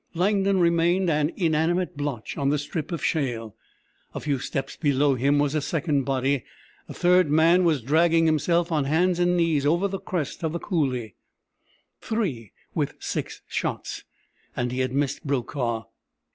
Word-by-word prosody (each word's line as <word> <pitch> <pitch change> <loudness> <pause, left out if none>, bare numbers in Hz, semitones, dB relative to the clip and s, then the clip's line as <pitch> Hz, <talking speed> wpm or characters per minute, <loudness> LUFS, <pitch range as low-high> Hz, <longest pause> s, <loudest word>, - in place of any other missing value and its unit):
Langdon 195 +2 +2
remained 170 +1 +3
an 150 +1 +1
inanimate 170 +1 +1
blotch 145 -6 -4
on 140 -2 0
the 150 - +2
strip 145 +2 -4
of 170 -4 -3
shale. 120 -8 -2 0.6
A - - -2
few 145 -3 -1
steps 135 +2 -4
below 145 -2 +2
him 140 +3 +2
was 145 0 +1
a 155 - 0
second 145 -2 0
body. 135 0 0 0.5
A - - -6
third 180 -2 +4
man 165 +4 +4
was 155 -7 +2
dragging 165 +4 +3
himself 170 +2 +2
on 150 -3 +1
hands 175 +5 +2
and 175 0 +2
knees 165 -4 +2
over 170 +7 +2
the 195 -1 -4
crest 165 -7 -4
of 160 -1 -1
the 170 - -2
coulée. 130 - -1 0.9
Three 155 - -3 0.2
with - - -1
six - - -5
shots! - - -3 0.5
And 120 0 -1
he 125 - -3
had 130 -1 0
missed 140 +1 -1
Brokaw! 120 -3 -2
150 Hz, 160 wpm, -25 LUFS, 135-170 Hz, 0.9 s, third